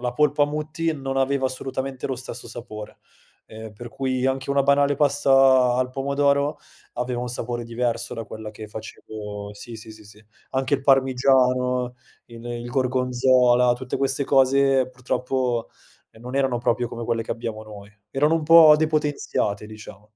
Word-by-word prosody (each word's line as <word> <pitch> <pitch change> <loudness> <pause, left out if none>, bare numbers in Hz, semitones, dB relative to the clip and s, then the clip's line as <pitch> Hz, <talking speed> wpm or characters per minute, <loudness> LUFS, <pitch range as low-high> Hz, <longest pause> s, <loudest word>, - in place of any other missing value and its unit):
la 125 0 -2
polpa 145 -1 +2
Mutti 155 +2 -2
non 135 -2 -4
aveva 135 0 +1
assolutamente 130 0 -4
lo 130 -2 -3
stesso 125 -2 -6
sapore, 110 -3 -9 0.5
ehm, 110 0 -10
per 120 +3 -10
cui 130 0 -2
anche 135 +1 -2
una 140 0 +3
banale 140 +1 +3
pasta 135 -3 +4
al 125 0 0
pomodoro, 140 +2 0 0.4
aveva 125 0 -2
un 125 - -4
sapore 120 0 -4
diverso 120 0 -2
da 115 - -5
quella 110 0 -8
che 110 0 -10
facevo 105 -1 -8
sì, 115 +2 -10
sì, 110 0 -11
sì, 110 -1 -15
sì. 105 +1 -16 0.3
Anche 135 +1 0
il 135 - -2
parmigiano, 125 -2 +2 0.3
il 115 0 -12
il 120 0 -5
gorgonzola, 125 -1 +3
tutte 125 0 -5
queste 135 0 0
cose 135 -1 +3
purtroppo, 125 -1 -2 0.4
ehm, 110 - -19
non 125 +2 -7
erano 130 -3 +1
proprio 120 0 0
come 120 -1 -6
quelle 115 -1 -1
che - - -9
abbiamo 115 -2 -4
noi. 105 -1 -12 0.2
Erano 150 +4 +2
un 165 - 0
po' 160 -1 +8
depotenziate 150 -9 -1
diciamo. 105 -2 -12
125 Hz, 160 wpm, -23 LUFS, 115-135 Hz, 0.5 s, po